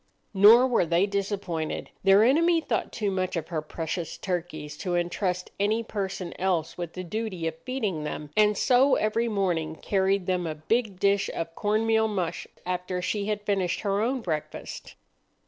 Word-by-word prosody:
Nor 215 +6 +8
were 250 -6 +2
they 170 +4 +3
disappointed. 195 -5 -3
Their 195 +2 +6
enemy 330 +7 +4
thought 265 -8 -2
too 210 -4 -1
much 185 -1 -1
of 165 -2 -3
her 160 -3 -2
precious 165 +2 -4
turkeys 165 -5 -4
to 180 0 -2
intrust 180 +1 -1
any 215 +3 +1
person 195 -5 -4
else 180 -4 0
with 175 -2 -5
the 185 - -5
duty 190 -2 -4
of 160 - -2
feeding 205 - -2
them, 150 -1 -5
and 210 -1 +4
so 260 +4 +4
every 225 +2 +1
morning 175 -7 -1
carried 195 +1 +1
them 180 -2 0
a 155 - -3
big 200 +5 -1
dish 200 +1 +2
of 165 0 -4
corn 215 +4 0
meal 220 0 +3
mush 190 -6 -3 0.2
after 180 0 -2
she 200 +3 -2
had 210 -1 -2
finished 190 -3 0
her 200 -1 0
own 250 +3 0
breakfast. 155 -7 -5
195 Hz, 170 wpm, -27 LUFS, 175-215 Hz, 0.2 s, Nor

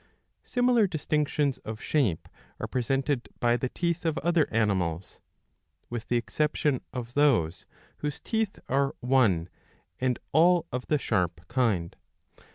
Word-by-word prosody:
^ - - -33 0.4
Similar 245 -4 +3
distinctions 150 -3 0
of 110 0 -7
shape 120 - 0 0.3
are - - -2
presented 135 +1 -1
by 120 0 +3
the 125 +1 -2
teeth 170 +2 -1
of 160 -2 0
other 170 -2 +2
animals, 95 -6 0 0.7
with 120 -2 -4
the 120 - +2
exception 150 +2 0
of 120 -1 -6
those 115 - +2 0.3
whose 150 -1 -4
teeth 220 -3 -1
are 135 +1 +1
one 115 -10 +3 0.5
and 125 -1 +1
all 170 +3 +5
of 125 0 -3
the 150 - +3
sharp 90 - -1
kind. 115 -9 0
130 Hz, 135 wpm, -28 LUFS, 110-150 Hz, 0.7 s, all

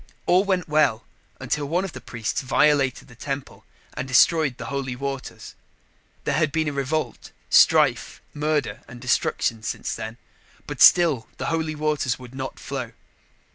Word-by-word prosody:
All 180 +2 +4
went 190 -3 0
well 150 -7 +2 0.3
until 150 -1 -2
one 175 +6 0
of 180 - -7
the - - -9
priests 115 -2 -3
violated 135 0 +2
the - - -15
temple 135 +3 -6 0.3
and 130 - -5
destroyed 140 0 +4
the - - -7
holy 135 -2 -3
waters. 135 +1 -6 0.7
There - - -1
had 155 -2 +1
been 155 -1 -1
revolt, 140 -2 -3 0.2
strife, - - +4
murder 150 0 -1
and 125 - -11
destruction 115 -2 0
since 110 - -4
then. 110 +2 -6 0.5
But - - -6
still 155 -10 +6
the - - -2
holy 160 -1 -1
waters 150 -5 -1
would 125 -1 -12
not 130 0 -6
flow. 130 -4 -6
140 Hz, 150 wpm, -24 LUFS, 125-155 Hz, 0.7 s, still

